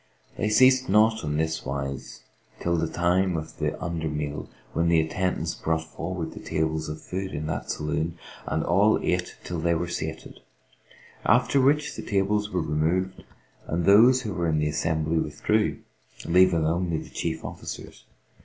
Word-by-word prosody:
They 105 - -1
ceased 130 +4 +5
not 110 +2 +4
on 75 0 -1
this 80 0 -1
wise 70 0 -5 0.4
till 85 0 0
the 80 0 0
time 90 +2 +1
of 80 0 -7
the - - -2
under 85 -3 -3
meal 75 -1 -4 0.2
when 85 0 +1
the 85 -1 +5
attendants 90 +4 -1
brought 80 0 -1
forward 80 +1 -5
the - - -9
tables 80 -1 -2
of 75 0 -5
food 95 -1 -5
in 75 +1 -3
that 75 -2 -4
saloon 80 +2 -2 0.3
and 80 -1 0
all 100 +5 +4
ate 90 0 -1
till 90 -2 -4
they 85 +1 +1
were 85 +2 -1
sated; 80 -2 -5 0.8
after 125 +4 +4
which 150 +3 +2
the - - -5
tables 105 +1 0
were 90 -4 -1
removed 80 +5 0 0.4
and 85 +1 -1
those 120 +6 +6
who 105 -4 -3
were 85 0 -1
in 80 - +1
the 75 0 +1
assembly 80 +1 0
withdrew, 105 +9 0 0.5
leaving 90 -2 +4
only 85 +1 0
the - - -8
chief - - -3
officers. - - -8
85 Hz, 165 wpm, -26 LUFS, 80-95 Hz, 0.8 s, those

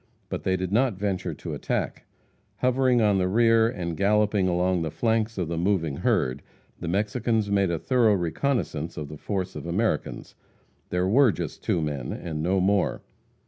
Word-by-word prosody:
But - - -3
they 95 0 0
did 95 0 -3
not 120 0 +2
venture 95 -4 -2
to - - -6
attack. - - -3 0.5
Hovering 125 -1 +2
on 100 -2 +3
the 90 - +1
rear, 115 +2 +4
and 85 -7 -4
galloping 105 0 +2
along 90 0 +1
the 80 - -2
flanks 115 +4 0
of 90 -3 -1
the 85 0 -2
moving 85 -6 0
herd, 65 -1 0 0.4
the - - -5
Mexicans 105 +3 0
made 100 -2 +2
a 85 - 0
thorough 115 - +3
reconnaissance 85 - -2
of 75 -2 -5
the 75 - -8
force 95 +2 -3
of - - -6
Americans. 105 +7 -2 0.6
There 90 +1 0
were 125 +4 +5
just - - -6
two 80 - 0
men, 70 -5 -3
and 80 -3 -4
no 95 +4 +1
more. 100 +1 +1
95 Hz, 175 wpm, -26 LUFS, 85-110 Hz, 0.6 s, were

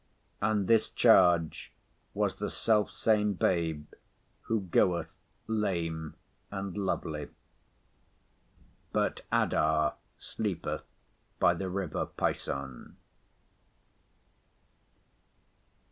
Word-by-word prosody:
And 105 -2 +1
this 115 -1 +4
charge 90 -8 +4 0.4
was - - 0
the - - -3
self 110 -2 +2
same 105 -2 +2
Babe, 85 -5 0 0.6
who 115 -2 +1
goeth 90 -1 +1 0.4
lame 85 -8 -2 0.3
and 100 -2 -5
lovely—but 80 -7 -3 2.0
Adah 75 -1 +2 0.2
sleepeth - - -3 0.5
by 85 - +5
the 95 +2 -4
river 90 -4 -2
Pison. 70 -2 -4
90 Hz, 70 wpm, -30 LUFS, 80-105 Hz, 2.0 s, by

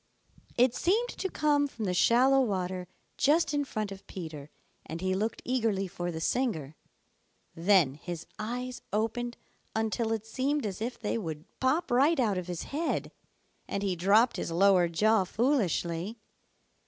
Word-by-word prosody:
It 245 0 +5
seemed 440 - +1
to 380 - -3
come 290 -3 +2
from 230 -6 -5
the 180 - 0
shallow 255 +8 +5
water 185 -5 -2 0.3
just 305 +1 +3
in 290 0 +1
front 215 -6 -3
of 195 0 -10
Peter, 155 -5 -7 0.3
and 165 - -6
he 185 +1 0
looked 215 +4 -2
eagerly 225 -6 0
for 175 -1 -4
the 160 -2 -4
singer. 160 - -1 0.8
Then 170 -5 +4
his 170 +3 -7
eyes 245 +3 -4
opened 230 +3 -1 0.4
until 220 +1 0
it 220 -1 -2
seemed 270 +4 -1
as 200 -1 -4
if 240 +2 -3
they 230 +1 -1
would 160 -5 -5
pop 265 +6 +1
right 275 +6 +4
out 210 -7 +2
of 180 - -7
his 175 -2 -4
head, 315 +4 -2 0.6
and 200 - -2
he 190 -2 0
dropped 205 +7 +4
his - - -3
lower 180 +1 +4
jaw 210 +5 +3
foolishly. 200 - 0
215 Hz, 155 wpm, -29 LUFS, 180-255 Hz, 0.8 s, It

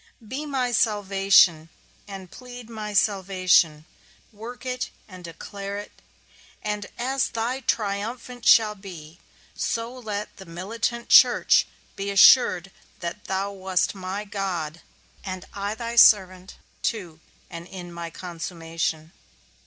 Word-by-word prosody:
Be 285 +7 -5
my 260 -3 -1
salvation, 195 -7 +3 0.4
and 195 -3 -9
plead 245 -2 -11
my 215 -2 -5
salvation; 185 -6 +2 0.5
work 230 +5 -10
it 255 0 -3 0.2
and 185 -2 -12
declare 200 +4 -7
it; 205 - -8 0.7
and 210 -1 -3
as 265 +2 0
thy 235 +3 -2
triumphant 230 +2 -3
shall 220 -3 +6
be, 175 -5 -11 0.3
so 230 +1 -3
let 215 -4 -6
the 190 - -11
militant 225 +7 -4
church - - +6 0.3
be 195 +1 -4
assured 195 -3 +6 0.3
that 175 +4 -6
thou 195 +1 -2
wast 190 -2 -1
my 195 +1 -5
God, 180 -6 -4 0.4
and 185 -2 -6
I 200 +1 -3
thy 235 +1 -5
servant, 185 -4 +5 0.3
to 175 -8 -3 0.3
and 170 +1 -8
in 175 -2 -9
my 170 0 -6
consummation. 165 -2 -5
200 Hz, 120 wpm, -24 LUFS, 180-225 Hz, 0.7 s, shall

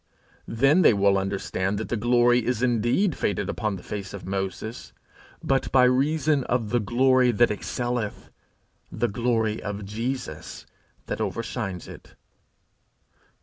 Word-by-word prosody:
Then 135 +9 +3 0.2
will 100 0 +4
they 95 - +2
understand 95 0 -2
that 110 - -4
the - - 0
glory 120 +1 +3
is 125 0 -1
indeed 120 - +2
faded 100 0 -1
upon 105 -3 -2
the 90 - -10
face 100 -1 -6
of 100 - -9
Moses, 95 +4 -5 0.5
but 135 -1 0
by 130 -1 +5
reason 140 +3 +2
of 115 -4 -1
the 120 - +2
glory 125 +3 +3
that 120 0 +3
excelleth, 120 +1 -3 0.6
the 120 - 0
glory 115 -1 0
of 100 0 -5
Jesus 115 - -5 0.4
that - - -4
overshines 110 -5 -4
it. - - -13
115 Hz, 135 wpm, -25 LUFS, 100-125 Hz, 0.6 s, by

